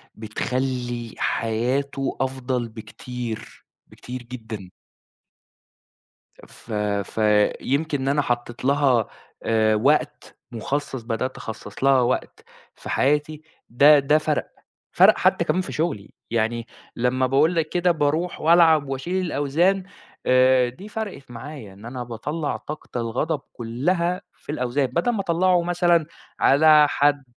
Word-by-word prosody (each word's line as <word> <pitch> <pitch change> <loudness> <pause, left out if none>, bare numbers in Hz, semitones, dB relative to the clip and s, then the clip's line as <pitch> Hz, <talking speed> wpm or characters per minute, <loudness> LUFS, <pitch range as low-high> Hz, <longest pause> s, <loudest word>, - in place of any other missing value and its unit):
بتخلِّي 120 +1 -3
حياته 130 +5 -1
أفضل 130 -2 -2
بكتير، 115 0 -8 0.2
بكتير 125 0 -9
جدًا. 110 -6 -8 1.8
ف - - -14 0.3
فيمكن 120 +9 +1
إن 135 - -1
أنا 145 +1 +2
حطِّيت 120 -2 -3
لها 135 -4 +3 0.4
آآ، 110 -1 +2
وقت 135 +8 0
مُخصَّص، 135 +2 -3
بدأت 115 +3 -3
أخصِّص 110 +1 -7
لها 135 -1 +5
وقت 125 +1 -2 0.3
في - - -11
حياتي، 150 +2 +1 0.3
ده 145 +5 +7
ده 140 +2 +3
فرق. 155 -1 -2 0.4
فرق - - +6
حتى - - +2
كمان 185 - +1
في - - -5
شغلي، 155 - -2 0.2
يعني 115 0 -1 0.3
لمّا 125 +2 +1
باقول 145 +6 +3
لك 165 -2 0
كده، 180 +1 +1
بارُوح 160 +2 0
وألعَب 160 -3 +5
وأشيل 175 +8 -2
الأوزان، 170 +6 +1 0.4
آآ، 130 0 +5
دي 185 +13 -11
فرقت 205 - -6
معايا 120 -3 -9
إن 100 +3 -15
أنا 125 +1 -5
باطلّع 145 +7 -3
طاقة 150 -4 -7
الغضب 130 +7 -2
كلها 170 +10 -1
في 145 - -9
الأوزان 130 0 0
بدل 185 - 0
ما 220 - -2
أطلعه 180 0 +2
مثلًا 175 -2 +2 0.3
على 150 +2 +6
حد. 145 -1 +2
135 Hz, 125 wpm, -23 LUFS, 120-155 Hz, 1.8 s, ده